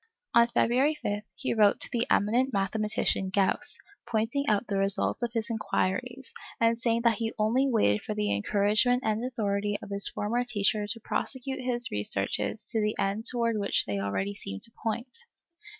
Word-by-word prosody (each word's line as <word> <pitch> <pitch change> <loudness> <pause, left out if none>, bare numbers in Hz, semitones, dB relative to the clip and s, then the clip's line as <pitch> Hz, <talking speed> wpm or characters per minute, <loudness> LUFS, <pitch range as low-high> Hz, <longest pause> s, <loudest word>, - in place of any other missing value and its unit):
On 235 0 +6
February 250 +5 +2
5, 205 -7 -3
he 265 - -2
wrote 210 -3 +4
to - - +2
the 235 -1 0
eminent 240 +6 +2
mathematician 200 -1 0
Gauss, 200 +10 +1 0.3
pointing 230 +5 0
out 210 +1 +2
the 200 -3 -2
results 195 +4 0
of 235 -1 -2
his 225 -1 -2
inquiries, 245 +4 -2 0.3
and 230 0 +3
saying 230 0 +1
that 235 -2 +3
he 225 -1 -2
only 230 +6 +2
waited 210 - +2
for 215 - -4
the 210 - 0
encouragement 210 - +2
and 220 +1 0
authority 205 -4 -1
of - - -10
his 200 0 +4
former 235 +4 -1
teacher 210 -3 +1
to 225 +2 -4
prosecute 265 +3 -3
his 245 -1 -1
researches 105 0 -2
to 220 - +1
the 210 0 0
end 200 +3 -1
towards 230 -3 0
which 200 - +1
they 100 -1 -2
already 100 - -2
seemed 95 - -6
to 230 - -2
point. 235 +2 -3
220 Hz, 175 wpm, -28 LUFS, 200-240 Hz, 0.3 s, On